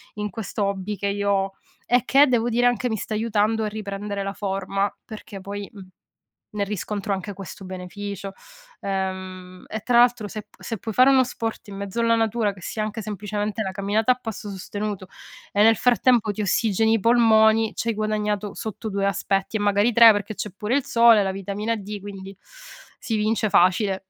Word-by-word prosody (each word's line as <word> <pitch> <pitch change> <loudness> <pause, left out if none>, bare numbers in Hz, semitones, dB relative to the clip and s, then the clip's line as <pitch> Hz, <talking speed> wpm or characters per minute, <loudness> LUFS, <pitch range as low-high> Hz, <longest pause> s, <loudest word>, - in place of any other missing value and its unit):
in 210 0 -3
questo 205 0 -3
hobby 200 +1 -3
che 200 - -1
io 200 0 -1
ho, 195 0 +1 0.4
e 245 0 +3
che, 280 +2 +6
devo 240 -2 +1
dire, 240 +1 +2
anche, 245 +1 +1
mi 220 - -1
sta 215 - -5
aiutando 220 0 +1
a 215 - 0
riprendere 205 -1 -5
la 195 0 -3
forma, 195 0 -2
perché 215 -3 -9
poi, 200 +1 -6
mhmm, 195 -3 -12 0.7
ne 210 -1 -1
riscontro 205 0 -3
anche 195 +1 -4
questo 195 +1 -9
beneficio, 195 +2 -6 0.5
ehm, 185 -1 -5
e 220 - -4
tra 240 0 +3
l'altro 240 -3 +3
se 215 +1 -6
p - - -27
se 225 - -5
puoi 220 +2 -6
fare 255 +4 +6
uno 260 -1 +5
sport 225 -3 -5
in 195 - -8
mezzo 200 +3 -4
alla 230 0 +3
natura, 225 -1 +1
che 185 - -15
sia 215 - -4
anche 215 +1 -4
semplicemente 210 +1 -3
la 190 - -3
camminata 205 +5 +1
a - - +3
passo 220 -3 -6
sostenuto, 200 0 -5 0.4
e 205 - +2
nel 225 +1 +6
frattempo 245 -3 +3
ti 210 - -4
ossigeni 220 +2 +2
i 225 - +2
polmoni, 220 -1 +4
c'hai 230 -1 -1
guadagnato 210 -1 -1
sotto 220 0 -5
2 200 -1 -1
aspetti 195 +2 -1
e - - -6
magari 205 +3 +2
3 230 -1 +9
perché 205 +1 -2
c'è 210 - -4
pure 215 +5 -1
il 280 - +1
sole, 230 -2 +6
la 190 - -1
vitamina 200 +4 -3
D, 205 -1 -6
quindi 195 -1 -9 0.6
si 225 - -2
vince 215 0 +1
facile 190 +2 +2
210 Hz, 190 wpm, -23 LUFS, 195-225 Hz, 0.7 s, 3